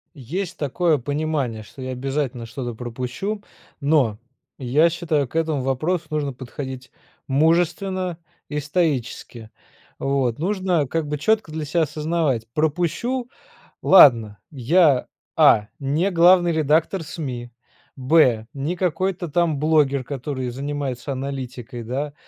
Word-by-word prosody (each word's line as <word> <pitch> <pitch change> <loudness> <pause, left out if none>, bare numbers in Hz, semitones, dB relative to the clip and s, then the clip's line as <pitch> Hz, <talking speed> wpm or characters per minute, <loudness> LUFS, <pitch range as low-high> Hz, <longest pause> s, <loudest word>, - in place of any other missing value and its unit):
Есть 170 - -5
такое 155 +3 +1
понимание, 145 -4 -2
что 130 - -13
я 130 0 -4
обязательно 130 -2 -3
что-то 120 +1 -5
пропущу, 125 - -4 0.4
но, 140 -8 +2 0.4
я 145 +6 +3
считаю, 160 -4 -1
к 140 - -18
этому 160 -4 0
вопросу 155 +7 -1
нужно 150 -3 -2
подходить 130 0 -8 0.4
мужественно 175 +5 +1 0.3
и 150 - -2
стоически. 140 -7 -2 0.5
Вот, 135 -3 0
нужно 180 -4 0
как 160 +3 -2
бы 150 0 -2
четко 220 +2 +1
для 155 0 -4
себя 165 +3 +1
осознавать, 150 -5 -1
пропущу- 180 - -1 0.5
ладно. 115 - +6
Я: 145 +1 +3 0.3
а) 105 0 +5
не 150 +8 0
главный 175 0 +5
редактор 160 +3 +1
СМИ, 135 -6 -6 0.5
б) 130 -5 +3
не 145 +5 -3
какой-то 185 0 -1
там 165 0 +1
блогер, 145 -3 +2
который 130 -1 -4
занимается 140 0 -4
аналитикой, 130 -2 -5
да, 140 +5 -3
145 Hz, 120 wpm, -22 LUFS, 130-165 Hz, 0.5 s, ладно